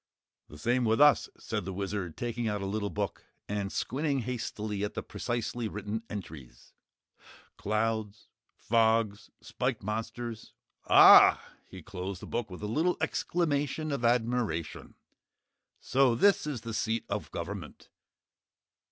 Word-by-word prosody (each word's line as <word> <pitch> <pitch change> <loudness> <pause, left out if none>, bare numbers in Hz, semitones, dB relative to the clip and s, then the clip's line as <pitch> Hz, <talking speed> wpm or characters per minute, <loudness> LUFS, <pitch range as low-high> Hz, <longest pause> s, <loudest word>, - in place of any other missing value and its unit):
"The 75 - -13
same 120 +10 +1
with 110 +1 +2
us," 150 0 +5
said - - -4
the 95 - -5
Wizard, 95 -3 -4
taking 120 -1 -2
out 105 -2 -2
a - - -2
little 100 +1 -2
book 100 -3 -4 0.2
and 100 -1 -3
squinting 140 0 -1
hastily 110 -4 -4
at 105 - -3
the - - -3
precisely 120 -1 -3
written 105 +1 -4
entries, 75 -12 -9 0.8
"'Clouds, 110 0 -2 0.3
fogs, 110 -2 +1
spiked - - -3
monsters,' 110 +2 -5 0.3
AH!" - - +9 0.3
He 95 -3 -10
closed 95 0 -6
the - - -9
book 120 -3 -3
with 90 +2 -9
a - - -1
little 160 +12 +1
exclamation 155 -2 -1
of 140 -4 -2
admiration. 115 -9 -1 0.8
"So 130 -2 +2
this 200 +4 +3
is 135 -6 -3
the 115 -1 -6
seat 110 0 -1
of 100 +1 -4
Government?" 85 -1 -7
110 Hz, 135 wpm, -30 LUFS, 100-120 Hz, 0.8 s, AH